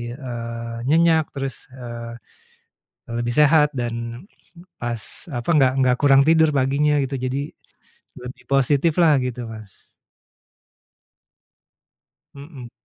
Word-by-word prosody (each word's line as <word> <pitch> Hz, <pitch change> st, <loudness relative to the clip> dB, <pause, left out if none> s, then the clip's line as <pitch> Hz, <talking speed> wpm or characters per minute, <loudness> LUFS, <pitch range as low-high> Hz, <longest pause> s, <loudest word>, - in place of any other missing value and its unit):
eee, 115 Hz, -3 st, -6 dB
nyenyak 160 Hz, 0 st, +3 dB
terus, 135 Hz, -2 st, -4 dB, 0.2 s
eee, 120 Hz, -2 st, -8 dB, 0.9 s
lebih 120 Hz, 0 st, -3 dB
sehat 150 Hz, 0 st, +5 dB
dan 115 Hz, +3 st, -5 dB, 0.5 s
pas 120 Hz, -2 st, -4 dB, 0.3 s
apa, 120 Hz, +4 st, -5 dB
enggak 135 Hz, -4 st, +4 dB
enggak 125 Hz, -1 st, +3 dB
kurang 135 Hz, -1 st, +5 dB
tidur 160 Hz, +1 st, +4 dB
paginya 140 Hz, +2 st, +2 dB
gitu. 135 Hz, 0 st, -3 dB
Jadi 130 Hz, +2 st, -2 dB, 0.8 s
lebih 125 Hz, 0 st, -10 dB
positiflah 150 Hz, +4 st, +3 dB
gitu 125 Hz, -1 st, -4 dB
Mas. 110 Hz, -3 st, -13 dB, 2.5 s
Mhm. 140 Hz, -4 st, -11 dB
130 Hz, 100 wpm, -21 LUFS, 120-150 Hz, 2.5 s, sehat